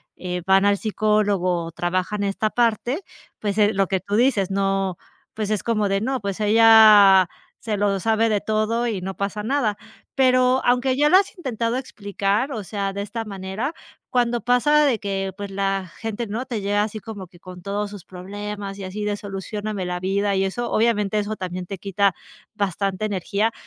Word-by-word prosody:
eh, 180 -1 -5
van 195 +1 +4
al 205 0 +3
psicólogo 205 -5 +1
o 165 - -7
trabajan 185 +4 -2
esta 200 +2 -1
parte, 240 - 0 0.4
pues, 205 -1 -2
eh, 210 0 +4
lo 195 -1 +1
que 190 0 0
tú 200 +3 -3
dices 220 -5 +2
no 195 -2 0 0.4
pues 215 -2 -3
es 215 -2 -1
como 215 -3 +1
de: 195 0 0
"No, 260 +3 -1
pues 200 -2 -4
ella 210 -3 +7 0.3
se 215 -2 -2
lo 200 -1 +1
sabe 225 +1 +2
de 210 -2 +1
todo 220 +2 0
y 215 -5 -2
no 190 +1 -5
pasa 205 +1 -3
nada", 225 -4 0 0.4
pero 255 -1 +3
aunque 250 +1 +2
ya 295 +1 +4
lo 365 - +5
has 390 0 0
intentado 240 - -2
explicar, 205 0 -2
o 220 -6 -4
sea, 200 0 -3
de 200 - -4
esta 225 +3 -4
manera, 200 - -4 0.4
cuando 240 -1 +1
pasa 270 +5 +3
de 250 -6 +1
que 195 -2 -3
pues 200 -1 -6
la 195 -1 -1
gente, 225 +1 -4
¿no?, 225 +5 -4
te 240 -4 -3
llega 205 +1 +1
así 215 0 -5
como 205 -3 -8
que 175 0 -20
con 180 0 -11
todos 205 +2 -3
sus 200 -3 -10
problemas 200 +2 -7
y 200 - -7
así 200 +3 -5
de: 205 0 0
"Solucióname 205 0 -5
la 180 0 -3
vida", 200 +2 0
y 190 - +1
eso, 235 +5 -2
obviamente 215 -2 +1
eso 210 +1 -2
también 180 0 -5
te 195 +2 -6
quita 200 0 +1 0.4
bastante 200 -1 -2
energía, 205 +2 -1
205 Hz, 190 wpm, -22 LUFS, 195-225 Hz, 0.4 s, ella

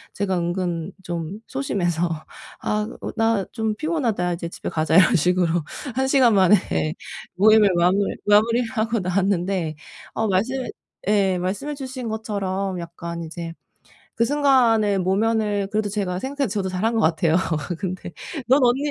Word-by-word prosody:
제가 190 -2 0
은근 175 0 -2
좀 170 +2 -4
소심해서 175 -10 -1 0.5
"아 210 0 -1 0.2
으 - - -3
나 225 -3 +1
좀 220 -2 -2
피곤하다. 230 - -1
이제 170 0 -5
집에 - - -6
가자." 155 0 0
이런 185 - +6
식으로 175 0 +2 0.3
1 265 0 +1
시간 260 -5 +5
만에 190 0 +6 0.8
모임을 215 +1 +6
마물 180 +3 +3 0.3
마무리를 230 +4 +4
하고 230 -1 0
나왔는데 185 -2 0 0.4
어 220 - 0
말씀해 235 +6 0 0.4
예 195 -3 +3
말씀해 205 +12 -3
주신 260 -4 -6
것처럼 195 -3 -3
약간 170 0 -6
이제 165 +1 -6 0.6
그 230 - +2
순간에 235 -7 +3
모면을 205 +2 +1
그래도 210 -1 0
제가 195 -3 -2
생각해도 275 +3 -2
저도 190 -2 -1
잘한 195 +5 0
것 225 - +2
같아요. 160 -1 +2 0.4
근데 185 -2 -5 0.4
"넌 265 +2 +5
언니 245 +2 +3
200 Hz, 295 characters per minute, -23 LUFS, 180-225 Hz, 0.8 s, 이런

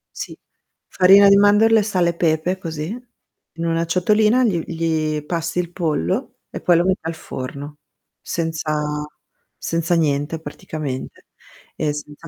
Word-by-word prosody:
Sì, - - -7 0.5
farina 200 +2 +6
di 200 - +7
mandorle, 210 +2 +5
sale 185 -5 +1
e - - -1
pepe, 170 +2 0
così. 160 -4 -5 0.7
In 165 +1 -4
una 165 0 0
ciotolina, 210 +8 +3
gli 185 -8 +1
gli 160 -2 -1
passi 165 +1 -2
il 175 -1 -3
pollo 155 - -2
e - - -6
poi 175 -2 +4
lo 170 - +3
metti 190 +1 +1
al 165 0 -4
forno, 145 +1 -7 0.4
senza 155 -2 -2 0.5
senza 165 +1 -1
niente 150 0 0
praticamente, 145 -3 -6 0.5
e 150 -2 0
senza 150 +2 -9
165 Hz, 135 wpm, -20 LUFS, 155-180 Hz, 0.7 s, di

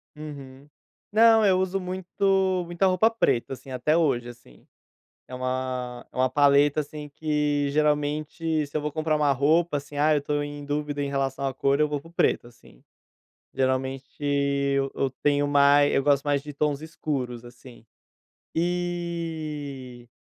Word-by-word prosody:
Uhum. 140 -2 -10 0.4
Não, 225 0 +6
eu 185 -2 +4
uso 190 +1 -1
muito 185 0 0
muita 175 +3 0
roupa 185 +4 +4
preta, 135 - 0
assim, 130 +1 -10
até 130 +5 +1
hoje, 130 -7 +1
assim. 120 - -16 0.6
É 130 - -9
uma 130 -1 -3
é - - -17
uma 130 0 +2
paleta, 145 +2 +4
assim, 150 0 -7
que 150 -1 0
geralmente 150 +1 0
se 145 - -7
eu - - +1
vou 150 +1 -3
comprar 155 -1 0
uma 150 -1 +2
roupa, 155 +4 +2
assim, 145 +1 -7
ah, 155 +1 +4
eu 145 - 0
tô 145 0 -1
em 145 0 -7
dúvida 145 0 -2
em 140 - -2
relação 135 0 -1
à 135 - -1
cor 140 +2 +1
eu 150 - +3
vou 145 -1 -2
para 165 - -15
o - - -19
preto, 170 - +1
assim. 115 - -19 0.7
Geralmente 130 0 -1 0.2
e 140 -1 +1 0.2
eu 135 - 0
tenho 145 0 +2
mais, 145 0 +5
eu 135 - +2
gosto 140 -1 +3
mais 145 -1 +1
de 150 +1 -9
tons 145 0 -1
escuros, 135 -7 -4
assim. 120 -1 -14 0.7
E, 160 -7 -4
145 Hz, 165 wpm, -25 LUFS, 135-155 Hz, 0.7 s, Não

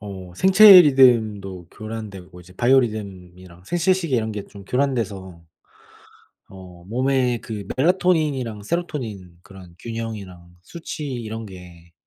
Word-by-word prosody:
어 95 -3 -9
생체 190 - +8
리듬도 110 - +2
교란되고 100 -5 -9
이제 90 +1 -17
바이오리듬이랑 95 -8 -2
생체시계 175 - 0
이런 110 -1 -2
게 105 -2 -6
좀 100 -1 -14
교란돼서 100 -10 -3 1.1
어 90 -2 -14
몸에 125 +2 0
그 105 -4 -8
멜라토닌이랑 150 - 0
세로토닌 110 - -5
그런 95 -4 -15
균형이랑 110 -7 -7
수치 155 - -8
이런 115 -4 -6
게 90 -3 -14
110 Hz, 280 characters per minute, -21 LUFS, 95-130 Hz, 1.1 s, 생체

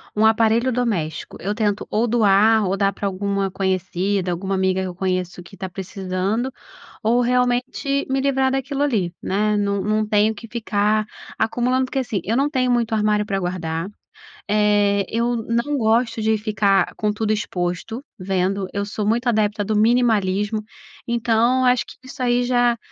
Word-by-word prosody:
um 215 +1 +4
aparelho 225 +3 +3
doméstico, 205 -11 -2
eu 205 +3 -2
tento 210 -2 -1
ou 220 +3 +1
doar 220 -1 +4
ou 190 +2 0
dar 200 0 +1
para 200 - -3
alguma 195 0 -1
conhecida, 190 0 -1
alguma 190 +3 -2
amiga 190 0 +1
que - - -3
eu 180 - -6
conheço 185 -1 -2
que 175 +3 -14
tá 190 - -4
precisando, 190 +5 -3 0.5
ou 235 +2 +3
realmente 250 +3 0
me 265 0 0
livrar 265 -1 +2
daquilo 270 +1 -2
ali, 205 -11 0
né. 210 +2 0
Não 200 -1 0
não 215 +2 0
tenho 215 +1 +3
que 225 +2 -11
ficar 215 -2 0 0.3
acumulando, 245 +3 +1
porque 260 +1 -3
assim, 225 -8 -2
eu 220 - 0
não 275 +4 +2
tenho 255 -4 0
muito 235 -2 +1
armário 210 -1 +1
pra 195 -2 -1
guardar, 175 -2 -3 0.6
eh, 205 -1 +3
eu 235 +1 +1
não 235 +5 -1
gosto 225 -1 +1
de 220 0 +2
ficar 205 -3 +1
com 210 -1 0
tudo 215 0 0
exposto 185 +4 -3 0.2
vendo, 190 +1 -1
eu 200 0 -2
sou 210 0 -3
muito 235 +4 +1
adepta 210 -2 +1
do 215 +1 -1
minimalismo, 215 -2 +2 0.4
então 235 +2 +2
acho 250 0 +3
que - - -12
isso 260 0 -7
aí 245 0 +2
já 245 -1 +2
215 Hz, 170 wpm, -21 LUFS, 195-240 Hz, 0.6 s, um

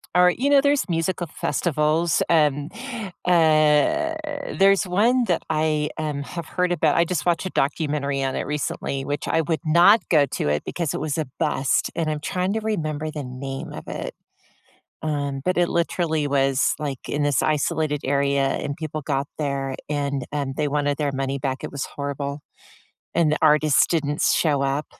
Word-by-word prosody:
or, 180 0 +6
you 265 +9 -1
know, 285 -1 +6
there's 285 -3 +2
musical 170 +1 -1
festivals, 155 +2 0
um, 150 -2 +2 0.6
eh, 165 - +4 0.4
there's 195 +1 +4
one 235 +7 +3
that 175 -6 0
I, 155 -1 +1
um, 150 -3 -3
have 170 +3 -6
heard 180 +2 -1
about. 155 -3 +2
I 170 - +4
just 170 -2 -2
watched 175 +1 +1
a - - -2
documentary 140 -2 -1
on 135 -1 -1
it - - -2
recently, 140 -2 -3
which 145 +1 -3
I 165 - +2
would 160 0 -1
not 175 +8 +6
go 150 -4 +5
to 135 - -3
it 75 0 0
because 170 -4 -2
it - - -3
was 155 0 -2
a 155 - -1
bust, 150 -4 +1
and 165 -2 -1
I'm 150 -1 -3
trying 185 +4 -1
to 220 - -1
remember 155 -8 -2
the 150 -2 -5
name 135 +2 -6
of - - -9
it. - - -5 0.9
Um, 145 -3 -2
but 185 +2 0
it 175 -1 +3
literally 165 -3 0
was, 135 -1 +2
like, 140 -4 -5
in 145 - -1
this 145 -3 +2
isolated 150 0 0
area, 140 0 +1
and 140 +1 -2
people 155 -1 -4
got 140 -1 -1
there, 140 -2 -2
and, 140 -3 -2
um, 140 -2 -2
they 150 - +1
wanted 145 0 0
their 145 -2 0
money 135 0 -2
back. 130 0 -3
It - - -5
was 140 -1 -4
horrible. 140 0 -4 0.7
And 160 -3 +3
the 155 - 0
artist 150 -1 +4
didn't 150 -3 0
s - - +3
show 145 -4 +2
up, 140 +2 0
150 Hz, 180 wpm, -23 LUFS, 140-170 Hz, 0.9 s, or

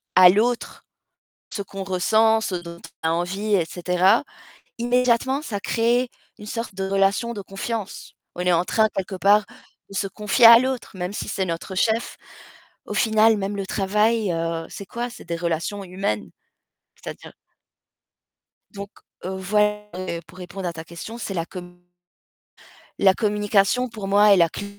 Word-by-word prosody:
à 185 -1 +9
l'autre 235 +5 0 0.7
ce 200 - -3
qu'on 195 0 -7
ressent, 220 +4 +2
ce 190 - -2
dont 170 -1 -8 0.2
on 160 - +2
a - - +1
envie 190 +5 -1
et 175 -4 +1
cetera, 180 - +2 0.5
immédiatement 250 +3 +1
ça 215 -9 -4
crée 240 +4 +1 0.3
une 210 - -11
sorte 230 -2 -5
de 190 0 -3
relation 195 +4 +1
de 205 - -6
confiance. 195 +2 -6 0.2
On 180 - -4
est 180 0 +2
en 170 +2 +2
train, 220 -1 +3
quelque 190 -1 -4
part, 200 +2 +4 0.4
de 195 - -10
se 195 0 -1
confier 210 +4 +2
à 230 0 +11
l'autre, 260 -2 -3
même 180 +2 -4
si - - -4
c'est 190 - -1
notre 170 +2 -5
chef. 225 +4 0 0.7
Au - - -5
final, 220 -1 +4
même 200 0 -3
le 195 -1 -4
travail, 210 +1 +1
heu, 165 0 -2
c'est 200 - -9
quoi? 240 +3 -4
C'est - - -12
des 170 -1 -3
relations 170 +4 -3
humaines. 180 - -3 0.7
C'est-à-dire - - -10 1.4
Donc 200 0 -8 0.3
heu, 190 +1 -4
voil 210 +2 +1 0.4
pour 175 +3 -16
répondre 180 +1 -6
à 170 - -4
ta 160 0 -8
question, 170 +8 -9
c'est 200 -4 -5
la 165 -1 -2
com 180 -1 -10 1.2
La 195 -1 +6
communication 210 +3 +1
pour 215 -4 -7
moi 205 +1 +5
est - - +7
la 170 -2 +4
cl - - -5
200 Hz, 165 wpm, -23 LUFS, 180-220 Hz, 1.4 s, à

